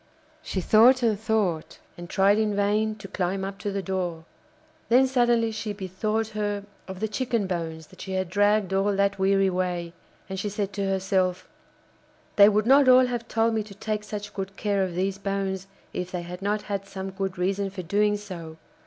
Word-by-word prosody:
She 190 - -3
thought 240 +7 +6
and 215 -4 +2
thought, 210 -7 -1 0.2
and 175 0 -9
tried 200 +2 +3
in 215 -2 +1
vain 210 +2 +1
to 205 -2 -10
climb 190 0 -2
up 195 0 -6
to 205 - -3
the 195 0 -3
door. 175 -3 -3 0.6
Then 250 +3 +6
suddenly 240 -3 +2
she 215 -1 -4
be 200 -1 -6
thought 215 +4 -1
her 205 -1 -2 0.2
of 190 0 -8
the 220 - +1
chicken 230 -1 -1
bones 165 -3 -4
that - - -12
she 190 - -5
had 185 -1 -1
dragged 205 0 +2
all 195 +1 +2
that 200 0 +1
weary 195 0 +3
way, 180 -2 -2 0.3
and 190 0 -5
she 205 - -2
said 200 -1 -3
to 195 -1 -1
herself: 185 -1 0 0.9
'They 200 0 +8
would 210 0 +1
not 270 +2 +6
all 255 0 +7
have 240 -2 -3
told 225 0 +1
me 220 - +1
to 205 -1 -10
take 210 0 -3
such 205 0 -6
good 195 0 -5
care 200 -2 +1
of 180 -2 -3
these 190 +2 -1
bones 195 -1 -2 0.3
if 180 0 -3
they 180 -1 -3
had 180 +2 -8
not 205 +1 -1
had 200 -1 -4
some 190 -1 -6
good 190 -1 -4
reason 195 +2 0
for 190 -1 -7
doing 205 +4 +2
so. 170 -6 -8
200 Hz, 200 wpm, -26 LUFS, 190-215 Hz, 0.9 s, They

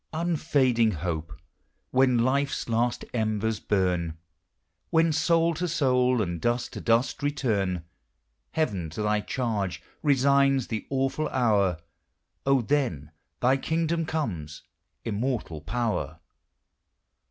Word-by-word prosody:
* - - -45
Unfading 130 -9 +2
Hope! 80 -2 -3 0.6
when 130 -1 +4
life's 135 +4 +1
last 120 +1 0
embers 110 -1 0
burn, 90 -5 0 0.7
When 165 -1 +3
soul 165 +2 +3
to 175 +3 -2
soul, 125 -6 +2
and 85 -3 -4
dust 120 +1 -1
to - - -6
dusl 115 +5 +1
return! 105 - 0 0.7
Heaven 100 - -1
to 85 - -5
tli 105 0 +2
v - - -10
charge 100 -9 -2 0.2
resigns 140 -2 +3
the 110 -2 -4
awful 135 +3 0
hour! 105 -8 +2 0.4
<), - - -51 0.2
then 90 - 0 0.3
thy 130 +2 +4
kingdom 165 +2 -1
comes! 90 - -3 0.4
Immortal 110 - -2
Power! 80 - -2
120 Hz, 115 wpm, -27 LUFS, 95-140 Hz, 0.7 s, when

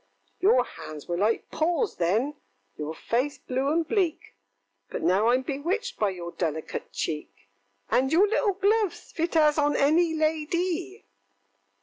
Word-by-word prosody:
ŌĆöŌĆ£Your 435 +7 +5
hands 150 -2 -9
were 175 - -1
like 210 +6 0
paws 350 +7 0
then, 215 - +1 0.4
your 155 +1 -5
face 255 - -1
blue 265 +2 -1
and 325 0 +1
bleak, 365 -6 -1 0.6
But - - -5
now 190 +4 +3
IŌĆÖm 250 +2 +3
bewitched 360 - -2
by 210 - +2
your 175 -2 -6
delicate 160 -3 -4
cheek, 150 -8 -3 0.6
And 265 - +2
your 365 +6 +5
little 420 -1 +1
gloves 405 +1 0
fit 335 +1 -2
as 305 -1 +4
on 295 0 +2
any 320 +3 +3
la 310 0 +1
dy! 340 - -2
295 Hz, 145 wpm, -26 LUFS, 205-345 Hz, 0.6 s, ŌĆöŌĆ£Your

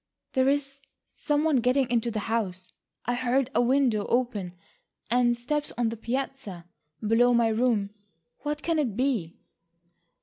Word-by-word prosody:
"There 260 0 +3
is 275 -1 -1 0.3
some 295 -1 0
one 315 -4 +3
getting 255 +2 +2
into 235 -1 +1
the 215 -2 -3
house. 195 -5 -3 0.3
I 245 - 0
heard 255 +1 0
a - - +3
window 245 -4 +2
open 225 -8 0 0.6
and 240 -1 +3
steps 295 +5 -2
on 240 -2 +1
the 230 - -4
piazza, 230 -6 -4 0.4
below 240 +3 +4
my 235 -1 +3
room. 220 -3 +1 0.5
What 295 0 -4
can 330 -2 +1
it 235 -9 -1
be?" 245 -11 -1
245 Hz, 145 wpm, -27 LUFS, 225-270 Hz, 0.6 s, below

